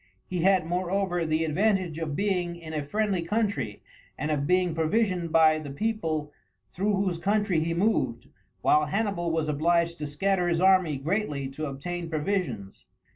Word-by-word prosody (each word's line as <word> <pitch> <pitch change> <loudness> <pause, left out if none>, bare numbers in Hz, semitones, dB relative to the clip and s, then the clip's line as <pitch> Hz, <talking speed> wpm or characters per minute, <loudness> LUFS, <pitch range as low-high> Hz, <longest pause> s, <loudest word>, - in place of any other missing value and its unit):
He 180 - -4
had, 185 -1 +3
moreover, 175 0 -1
the 155 +1 +1
advantage 185 0 +1
of 155 -3 -3
being 180 -3 0
in 165 -2 -9
a 155 - -1
friendly 195 +5 -1
country, 210 +4 -2 0.3
and 150 - -2
of 145 -1 0
being 180 -1 +2
provisioned 175 +1 0
by 155 -1 +5
the 150 -2 -7
people 155 -4 -2 0.4
through 205 +3 0
whose 190 -3 -1
country 200 -2 +1
he 165 +1 -1
moved, 150 - 0 0.3
while 150 0 +3
Hannibal 195 -1 -1
was 160 -1 0
obliged 170 +3 +1
to 150 - -3
scatter 180 +5 0
his 170 -1 +1
army 185 -5 +4
greatly 150 -2 -2
to 155 +3 -5
obtain 170 +5 -5
provisions. 160 - -3
170 Hz, 160 wpm, -27 LUFS, 155-195 Hz, 0.4 s, by